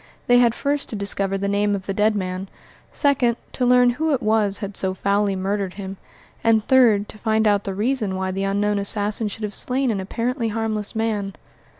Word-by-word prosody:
They 245 0 +5
had 235 -1 +3
first 285 0 -1
to - - -4
discover 200 -1 -1
the 200 +1 -2
name 205 0 +1
of 190 -1 -6
the 195 - -2
dead 210 +2 +2
man; 185 -1 -4 0.4
second, 250 -5 +2 0.2
to 250 - 0
learn 250 0 +5
who 310 +3 0
it 255 - -5
was 215 -2 +2
had 200 -1 -6
so 190 -1 0
foully 200 +1 +1
murdered 195 0 -2
him; 195 -1 -7 0.5
and 220 -2 +3
third, 230 -6 +4
to 215 - -12
find 220 -1 +1
out 205 -1 +2
the 195 -1 -3
reason 215 -2 -1
why 190 0 -2
the 195 +1 -2
unknown 205 +1 0
assassin 205 +2 0
should 215 +2 -7
have 210 -1 -3
slain 255 0 +1
an 205 - -2
apparently 230 +5 -2
harmless 220 -1 -2
man. 215 -3 -1
210 Hz, 205 wpm, -22 LUFS, 200-230 Hz, 0.5 s, They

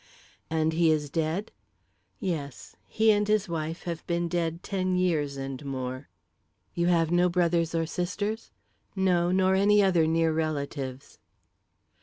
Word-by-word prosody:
"And 160 0 +1
he 165 0 +3
is 150 -2 0
dead?" 165 +7 -2 0.7
"Yes; 150 -8 -5
he 220 0 +3
and 205 0 +2
his 210 -1 +2
wife 165 -1 -4
have 170 -2 -5
been 170 0 0
dead 170 -1 -2
ten 185 -2 -1
years 155 -6 0
and 135 +1 -5
more." 130 -1 -5 0.6
"You 170 0 0
have 165 -2 +2
no 175 +1 +4
brothers 170 -2 +1
or 165 0 +1
sisters?" 205 +6 -3 0.5
"No; 180 -2 +2
nor 190 0 +3
any 205 +2 +4
other 175 -5 +3
near 165 0 +2
relatives." 140 -4 -4
170 Hz, 140 wpm, -27 LUFS, 155-185 Hz, 0.7 s, no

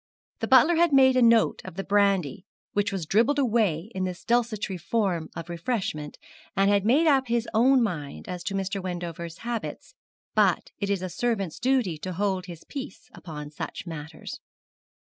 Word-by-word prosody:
The - - -2
butler 285 +6 +6
had 340 -1 +4
made 265 -1 +6
a 255 - +4
note 230 -1 +4
of - - -9
the 195 - -3
brandy 195 -6 +1 0.3
which 205 +1 +1
was 190 -5 -3
dribbled 230 - +3
away 220 - +1
in 185 - -2
this 185 -1 -4
desultory 220 -6 0
form 175 -2 -1
of 165 -1 -6
refreshment, 170 -4 -3 0.4
and 195 +1 +4
had 200 0 +2
made 285 +8 +4
up 270 -4 +3
his 235 0 0
own 250 +3 +5
mind 150 -10 -4
as 180 -1 -5
to 195 - -2
Mr. 195 0 -2
Wendover's 170 -2 -5
habits; 240 - -5 0.4
but - - +2
it 200 - -2
is 195 -2 0
a - - -2
servant's 195 -2 -2
duty 245 - +1
to 185 +3 -5
hold 190 0 -1
his 170 -2 -9
peace 270 -8 -8
upon 150 -3 -8
such 150 - -6
matters. 160 -1 -8
195 Hz, 175 wpm, -26 LUFS, 175-235 Hz, 0.4 s, butler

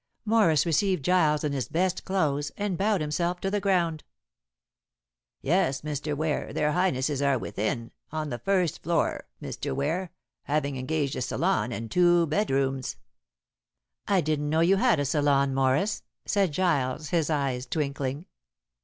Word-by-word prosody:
Morris 210 -9 +4
received 175 -1 +1
Giles 160 -5 +3
in 150 - 0
his 130 -5 -2
best 180 +2 0
clothes, 150 -7 0
and 205 -3 -1
bowed 200 0 +1
himself 170 +4 -1
to 195 - -1
the 205 - +1
ground. 175 -5 +1 1.4
"Yes, 140 -4 +1
Mr. 150 0 -3
Ware, 155 0 -1
their 150 - +1
Highnesses 145 -5 0
are 140 -2 +3
within 115 +1 -3 0.2
on 155 -1 -3
the 120 - -4
first 185 -5 0
floor, 170 +1 0
Mr. - - -4
Ware, 165 +6 -1 0.3
having 145 -1 0
engaged 140 +2 -1
a - - -3
salon 125 - 0
and 115 -1 -5
two 175 -1 +4
bedrooms." 135 - 0 1.1
"I 195 -3 +3
didn't 150 -2 -1
know 160 +2 +2
you 185 +4 +4
had 235 - +3
a 145 - 0
salon, 140 -1 +2
Morris!" 135 +10 +1 0.2
said 195 -5 +1
Giles, 150 -4 0
his 165 -3 +1
eyes 135 -4 -1
twinkling. 140 +1 -2
155 Hz, 145 wpm, -27 LUFS, 140-180 Hz, 1.4 s, Morris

